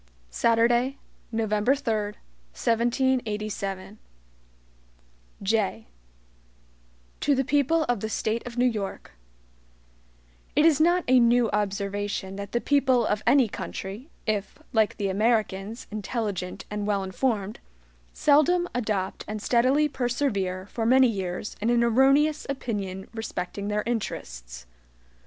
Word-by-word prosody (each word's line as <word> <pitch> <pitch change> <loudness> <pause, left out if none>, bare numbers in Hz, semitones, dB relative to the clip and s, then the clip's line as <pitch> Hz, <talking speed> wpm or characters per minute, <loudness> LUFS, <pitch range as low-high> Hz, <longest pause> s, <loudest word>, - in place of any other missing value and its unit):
Saturday, 240 - +2 0.3
November 220 +2 +1
3, 215 -5 -2 0.4
1787 215 -5 -1 1.4
JAY 195 - 0 1.3
To 285 -1 +2
the 270 - +1
People 290 +4 +2
of 245 -6 0
the 220 - -3
State 220 +1 -1
of 245 0 -8
New 245 - +3
York: 210 -5 -3 1.4
IT 295 +2 +5
IS 310 -2 +5
not 350 +2 +4
a 255 0 +6
new 235 -1 +4
observation 200 -1 -2
that 200 0 -6
the 240 - +1
people 260 -3 +3
of 210 0 0
any 270 -4 +5
country 205 +6 -6 0.2
(if, 210 -2 -2 0.2
like 220 -2 +2
the 200 -2 -1
Americans, 215 +1 0
intelligent 205 -3 -4
and 210 0 -3
wellinformed) 205 +1 -1 0.5
seldom 310 +5 +3
adopt 210 -6 -2
and 215 0 -4
steadily 255 +7 +3
persevere 240 -9 -1
for 225 +3 -4
many 255 +3 +6
years 190 -1 -4
in 225 - +1
an 240 0 +3
erroneous 275 +6 +3
opinion 200 -8 -4
respecting 200 -3 -4
their 210 0 0
interests. - - -5
225 Hz, 115 wpm, -26 LUFS, 200-255 Hz, 1.4 s, a